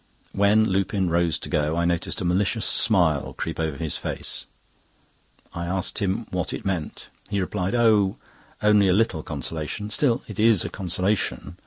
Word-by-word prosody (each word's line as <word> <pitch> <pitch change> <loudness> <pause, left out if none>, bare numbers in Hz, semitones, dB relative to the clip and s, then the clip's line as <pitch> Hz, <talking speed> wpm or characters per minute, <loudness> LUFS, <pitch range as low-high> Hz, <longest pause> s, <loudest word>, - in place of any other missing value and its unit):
When 100 +2 +4
Lupin 95 -2 0
rose 85 -2 +2
to - - -6
go 75 +2 0
I 85 - +1
noticed 85 +2 -1
a - - -2
malicious 95 +5 +1
smile 85 -10 +2
creep 80 - -4
over 80 -3 -2
his 80 -2 -1
face. - - -3 1.1
I 85 0 -4
asked 95 +3 -1
him 105 +3 -1
what 90 0 -2
it - - -6
meant. 90 -6 -4 0.2
He 100 - -1
replied: 95 +2 -2
"Oh! 110 -5 +3 0.5
only 105 -1 +5
a 90 - +4
little 105 -6 +1
consolation—still 85 - -2
it - - -8
is 110 -1 +4
a - - -3
consolation. 90 0 -2
95 Hz, 160 wpm, -24 LUFS, 85-105 Hz, 1.1 s, only